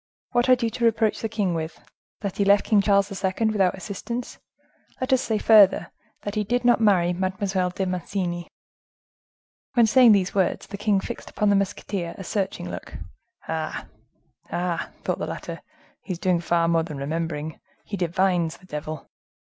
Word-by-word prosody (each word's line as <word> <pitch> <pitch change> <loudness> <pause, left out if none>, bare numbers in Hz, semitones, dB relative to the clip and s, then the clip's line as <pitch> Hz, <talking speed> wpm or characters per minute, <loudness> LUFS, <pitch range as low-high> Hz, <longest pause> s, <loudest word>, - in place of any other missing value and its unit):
What 240 0 +2
had 255 -1 +4
you 230 - +1
to 235 - -4
reproach 220 -1 +2
the 225 - -2
king 205 -5 0
with?—that 165 +4 -7
he 200 - +3
left 200 0 +5
King 210 -2 +4
Charles 200 0 +3
II. 190 +4 +1
without 195 -4 +2
assistance?—let 250 +7 -6
us 260 - +4
say 220 -2 0
further—that 205 -1 +3
he 210 -1 0
did 245 +4 -1
not 240 -1 +4
marry 180 -5 +4
Mademoiselle 185 0 -1
de 190 +2 -3
Mancini?" 180 -1 -3 1.3
When 235 -2 +6
saying 235 0 +7
these 195 -2 +1
words, 190 -3 +1
the 200 - -7
king 205 -1 +2
fixed 240 - -7
upon 210 -1 +1
the - - +4
musketeer 195 -3 -2
a 195 - -7
searching 190 - -2
look. 90 - -8 0.5
"Ah! 160 -1 -3 0.7
ah!" 175 -1 -2
thought - - -1
the - - -3
latter, - - -6 0.4
"he 190 - -4
is - - -6
doing 180 0 +1
far 170 -1 +2
more 165 -1 +3
than 160 -3 -6
remembering, 155 +1 -3 0.3
he 205 - -4
divines. 175 -2 +1
The 185 - -19
devil!" 155 -2 -6
195 Hz, 165 wpm, -24 LUFS, 175-215 Hz, 1.3 s, saying